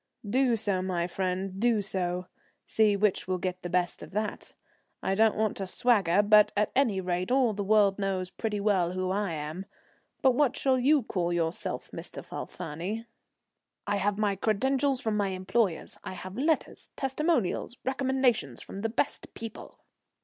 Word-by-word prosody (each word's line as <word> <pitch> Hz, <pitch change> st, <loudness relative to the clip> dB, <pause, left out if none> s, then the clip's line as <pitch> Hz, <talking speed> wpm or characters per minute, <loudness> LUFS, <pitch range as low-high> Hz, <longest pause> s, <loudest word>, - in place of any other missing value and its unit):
"Do 250 Hz, +2 st, +3 dB
so, 200 Hz, -4 st, 0 dB
my 180 Hz, -2 st, -1 dB
friend, 185 Hz, +1 st, -2 dB
do 235 Hz, -1 st, +3 dB
so. 180 Hz, -2 st, -2 dB, 0.4 s
See 215 Hz, -2 st, +3 dB
which 200 Hz, -2 st, +1 dB
will 185 Hz, 0 st, 0 dB
get 185 Hz, 0 st, -3 dB
the 175 Hz, -, -5 dB
best 175 Hz, 0 st, 0 dB
of -, -, -10 dB
that. 210 Hz, +1 st, -3 dB, 0.5 s
I 190 Hz, -, +1 dB
don't 220 Hz, +2 st, +4 dB
want 215 Hz, -1 st, 0 dB
to 195 Hz, -, -4 dB
swagger, 205 Hz, -4 st, +3 dB
but 210 Hz, 0 st, +6 dB
at 210 Hz, 0 st, +2 dB
any 235 Hz, -8 st, +3 dB
rate 180 Hz, 0 st, -2 dB
all 255 Hz, -4 st, +3 dB
the 205 Hz, 0 st, -3 dB
world 205 Hz, -1 st, +4 dB
knows 190 Hz, -2 st, -1 dB
pretty 215 Hz, -2 st, -2 dB
well 190 Hz, -4 st, +2 dB
who 185 Hz, 0 st, -1 dB
I 200 Hz, -3 st, -1 dB
am; 155 Hz, +5 st, -5 dB, 0.6 s
but 265 Hz, -, +7 dB
what 280 Hz, +1 st, +2 dB
shall 260 Hz, -1 st, +2 dB
you 280 Hz, +2 st, +4 dB
call 175 Hz, -5 st, -1 dB
yourself, 170 Hz, -1 st, -2 dB
Mr. -, -, -8 dB
Falfani?" 190 Hz, +10 st, -5 dB, 0.8 s
"I 205 Hz, -1 st, 0 dB
have 200 Hz, 0 st, 0 dB
my 210 Hz, -2 st, +1 dB
credentials 265 Hz, +6 st, +1 dB
from 220 Hz, -2 st, -1 dB
my 205 Hz, -1 st, +1 dB
employers; 185 Hz, 0 st, -1 dB
I -, -, -5 dB
have 185 Hz, +1 st, -8 dB
letters, 305 Hz, +6 st, -1 dB
testimonials, 270 Hz, -, 0 dB
recommendations 260 Hz, -, +1 dB
from -, -, -9 dB
the 225 Hz, +3 st, -1 dB
best 255 Hz, +5 st, -1 dB
people." 225 Hz, -1 st, -9 dB
205 Hz, 165 wpm, -29 LUFS, 185-230 Hz, 0.8 s, but